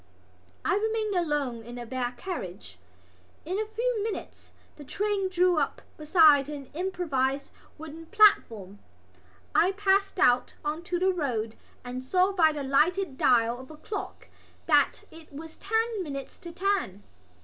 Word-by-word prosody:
I - - +2
remained 435 0 -1
alone 295 -9 -1
in 240 +2 -10
the 240 -1 -6
bare 245 0 -3
carriage. 185 - -7 0.7
In 370 +5 -2
a 435 - -2
few 455 +1 -1
minutes 430 0 -6 0.2
the 295 - -11
train 400 +5 -1
drew 360 -2 +3
up 280 - -2
beside 300 -3 +5
an 280 -3 -8
improvised 290 -6 -1 0.3
wooden 320 +1 -10
platform. 225 - +3 0.7
I 370 +3 +3
passed 395 0 +1
out 250 -9 +3
on 305 +2 -2
to 355 0 -1
the 375 +2 +2
road 235 -10 -2 0.3
and 250 +1 -6
saw 365 +8 +2
by 330 -5 +4
the 295 -2 -5
lighted 305 +4 +1
dial 235 -1 +3
of 260 - -11
a 310 - -11
clock 405 +6 -7 0.4
that - - +3
it 320 -1 -15
was 315 +3 -9
ten 445 +1 -1
minutes 275 -5 -7
to 340 - -9
ten. 360 - -1
320 Hz, 150 wpm, -27 LUFS, 265-385 Hz, 0.7 s, beside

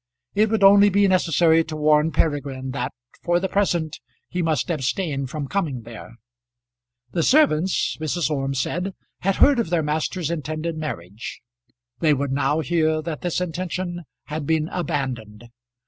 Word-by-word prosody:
It 215 +1 +3
would 220 -2 +1
only 200 +1 +8
be 200 +1 +3
necessary 165 -3 +3
to 160 - -6
warn 150 +1 +3
Peregrine 140 -5 -1
that 125 -1 -3 0.3
for 175 0 +2
the 190 - -1
present 170 -6 0 0.3
he 180 - -2
must 160 0 0
abstain 145 -1 -1
from 145 +1 -5
coming 145 - -2
there. 115 0 -11 1.0
The 170 - 0
servants, 190 - +3
Mrs. 155 0 -1
Orme 135 -1 -1
said, 180 +8 -2 0.2
had 195 +1 +1
heard 280 -3 +5
of 230 - 0
their 170 -2 +1
master's 155 +2 -1
intended 155 +1 -3
marriage. 105 - -6 0.6
They 155 -3 +3
would 140 0 -2
now 145 +3 +1
hear 155 0 +1
that 155 -2 -5
this 175 -1 -1
intention 180 0 -3 0.2
had 150 -1 -5
been 160 0 +1
abandoned. 125 - -4
160 Hz, 150 wpm, -23 LUFS, 140-180 Hz, 1.0 s, only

